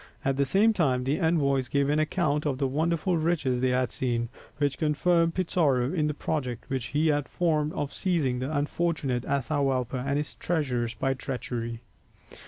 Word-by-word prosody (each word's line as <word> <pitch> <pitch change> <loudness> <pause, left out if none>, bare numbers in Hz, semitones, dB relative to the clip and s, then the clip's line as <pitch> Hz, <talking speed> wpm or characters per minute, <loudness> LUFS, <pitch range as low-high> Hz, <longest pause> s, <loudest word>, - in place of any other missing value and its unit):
At 135 0 +2
the 140 +1 +2
same 210 +9 +4
time 135 -10 +1
the 135 +6 0
envoys 140 -6 +2
gave 140 +1 +1
an 150 +2 +2
account 155 -2 0
of 135 -3 -1
the 135 - 0
wonderful 165 +5 0
riches 155 -6 0
they 130 - +2
had 125 -1 +1
seen, 120 -2 -1 0.3
which 145 -2 0
confirmed 165 +2 +2
Pizarro 150 -8 +1
in 155 -4 +1
the 150 - -2
project 130 -7 -3
which 130 -3 -1
he 155 +4 +1
had 145 -2 0
formed 155 -3 +1
of 145 -1 -3
seizing 155 -10 0
the 130 +4 -3
unfortunate 145 -4 -1
Atahualpa 135 -3 0
and 140 +1 0
his 150 0 -3
treasures 125 -8 -1
by 135 +4 0
treachery. 120 -3 -4
145 Hz, 175 wpm, -27 LUFS, 130-160 Hz, 0.3 s, same